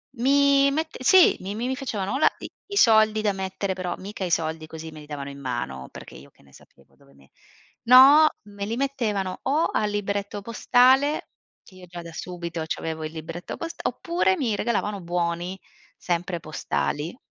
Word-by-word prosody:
Mi 280 +2 +4
mette 315 +3 -3
sì, 370 +6 +6
mi 195 +2 -6
mi 250 +4 -2
facevano 220 -8 -4
o - - 0
la - - +5
ti - - -8 0.2
i 400 - -6
soldi 220 - +5
da 210 -2 +1
mettere, 190 0 -3
però 185 -1 -4
mica 200 +1 -7
i 180 - -2
soldi 160 -1 -1
così 160 0 -9
me 155 - -11
li 150 - -13
davano 140 -2 -6
in 140 - -11
mano, 120 - -5
perché - - -12
io - - -13
che - - -27
ne 70 - -23
sapevo - - -21
dove 70 - -23
me 70 0 -23 0.5
no, 275 +6 +8
me 205 -1 -7
li 225 - -2
mettevano 220 -9 -2
o 295 +5 +1
al 210 - +1
libretto 205 0 -3
postale, 260 +6 +3 0.3
che - - -19
io 185 -1 -13
già 175 0 -9
da 170 - -9
subito 170 -1 -5
c'avevo 160 0 -4
il 155 - -5
libretto 165 +2 -7
post 330 0 -7
oppure 360 +2 0
mi 240 -9 0
regalavano 210 -2 -2
buoni, 175 +1 -2 0.4
sempre 175 0 -2
postali. 150 - -3
195 Hz, 185 wpm, -24 LUFS, 165-250 Hz, 0.5 s, no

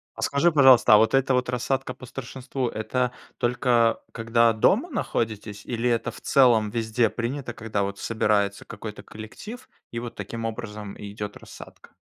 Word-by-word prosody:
А - - -8
скажи, 165 +5 +2
пожалуйста, 130 -7 +7
а - - +10
вот 110 +2 +3
эта 135 0 +3
вот 125 0 +1
рассадка 130 +1 -1
по 130 - -13
старшинству- 130 0 -4
это 125 +3 -1 0.3
только 120 -1 +2
когда 115 0 +3
дома 205 - +2
находитесь, 110 - -3
или 120 0 -1
это 115 -1 0
в - - -12
целом 120 -6 +4
везде 115 +1 +1
принято, 120 +1 -4
когда 110 -3 -2
вот 100 0 -3
собирается 105 -3 0
какой-то 105 -2 -8
коллектив 210 - -10 0.2
и 115 - -5
вот 120 -1 -7
таким 115 -1 -6
образом 105 -3 -5
и 100 -1 -8
идет 105 0 -6
рассадка? - - -13
115 Hz, 165 wpm, -25 LUFS, 110-125 Hz, 0.3 s, а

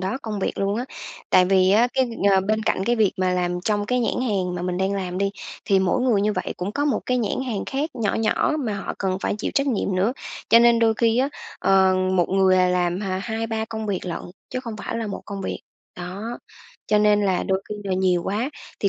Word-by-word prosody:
đó 190 +8 -2
công 215 -2 -4
việc - - -2
luôn 200 +1 0
á, 245 - -2 0.5
tại 185 - +6
vì 185 0 +4
á 225 +5 +4
cái, 260 -1 +3
ừm, 225 -4 +1
ờ, 190 - +4
bên 215 +3 0
cạnh 190 - 0
cái 240 +2 +1
việc 215 -4 +3
mà 185 -1 +1
làm 180 0 -1
trong 205 +1 0
cái 250 +1 +1
nhãn 235 - 0
hàng 185 -5 -1
mà 175 - -4
mình 180 0 -2
đang 190 +1 0
làm 185 -2 -3
đi, 200 0 +1 0.3
thì 195 -1 +3
mỗi 190 +6 +1
người 240 -6 +3
như 210 +1 +1
vậy - - -3
cũng 190 +3 -4
có 290 +4 -1
một 290 - +1
cái 250 0 +1
nhãn 220 0 -1
hàng 220 -6 -2
khác 285 +4 -2
nhỏ 225 -5 -1
nhỏ 225 +6 +1
mà 215 -3 -1
họ 195 - -4
cần 190 -1 -1
phải - - -1
chịu - - -2
trách 275 0 +2
nhiệm 205 -6 0
nữa. 200 +7 +2 0.4
Cho 230 - +8
nên 235 0 +5
đôi 225 -1 +3
khi 230 +1 +2
á, 270 +2 +2 0.3
ờ, 190 -1 +4 0.2
một 175 -2 +2
người, 190 -1 +4
à, 180 0 +4
làm 180 0 0
h 210 - -4 0.2
hai 225 0 -3
ba 220 -1 -2
công 220 -1 -5
việc 190 -2 -3
lận 170 - -3 0.3
chứ 255 - -3
không 230 -4 -6
phải 215 - -5
là 230 -1 -3
một 200 - -5
công 200 -1 -5
việc. - - -4 0.4
Đó, 180 +3 -6 0.6
cho 210 0 +3
nên 210 0 +4
là 185 -2 +1
đôi 190 0 -1
khi 210 - -4
là 190 - -1
nhiều 185 -2 +2
quá 220 +8 -1 0.3
thì 200 - +3
205 Hz, 255 wpm, -23 LUFS, 190-225 Hz, 0.6 s, Cho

